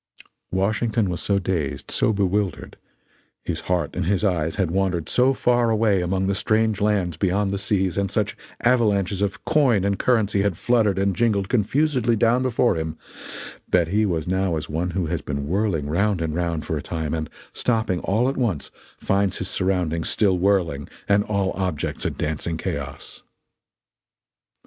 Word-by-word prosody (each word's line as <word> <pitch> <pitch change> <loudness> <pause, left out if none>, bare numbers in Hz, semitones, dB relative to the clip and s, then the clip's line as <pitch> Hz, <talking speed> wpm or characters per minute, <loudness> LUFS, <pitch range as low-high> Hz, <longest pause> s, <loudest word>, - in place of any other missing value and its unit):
Washington 105 +2 0
was 85 - -4
so 100 - +1
dazed, 90 -7 -2
so - - +2
bewildered 100 -1 -1 0.7
his - - -3
heart 90 -1 -1
and - - -1
his 100 +1 +1
eyes 80 -5 0
had 95 -5 0
wandered 90 -3 0
so 125 +2 +3
far 120 -2 +2
away 110 -4 +2
among 95 +2 0
the 100 - +1
strange 110 +1 +1
lands 100 -6 +1
beyond 95 +2 +1
the 100 - -2
seas, 95 -3 0
and 100 -1 0
such - - -1 0.3
avalanches 105 -6 +2
of 100 -2 -2
coin 130 - +3
and 100 -1 0
currency 105 -5 +2
had 100 -4 0
fluttered 110 -5 +2
and 100 -1 +1
jingled 100 -3 +1
confusedly 125 +1 +2
down 115 +3 +3
before 125 -1 +2
him, 80 0 -4 0.7
that 85 -2 +3
he 105 +4 +2
was 85 -6 -1
now 95 -2 0
as 75 - -5
one 85 +4 -2
who 90 0 -1
has 80 0 -2
been 70 -1 -4
whirling 95 -4 0
round 100 +5 +1
and 80 -2 -2
round 85 -2 -2
for 80 - -2
a - - -4
time, 80 -1 -3
and, 80 -2 -3 0.2
stopping 110 -7 0
all 110 +8 +1
at 135 - -1
once, 105 - -1 0.3
finds 100 -1 0
his 95 - -4
surroundings 90 -4 0
still 95 -4 +2
whirling 85 -7 +1 0.2
and 100 0 +3
all 100 -2 0
objects 90 -6 -3
a - - +2
dancing 80 +2 -3
chaos. - - -6
95 Hz, 170 wpm, -23 LUFS, 85-105 Hz, 0.7 s, so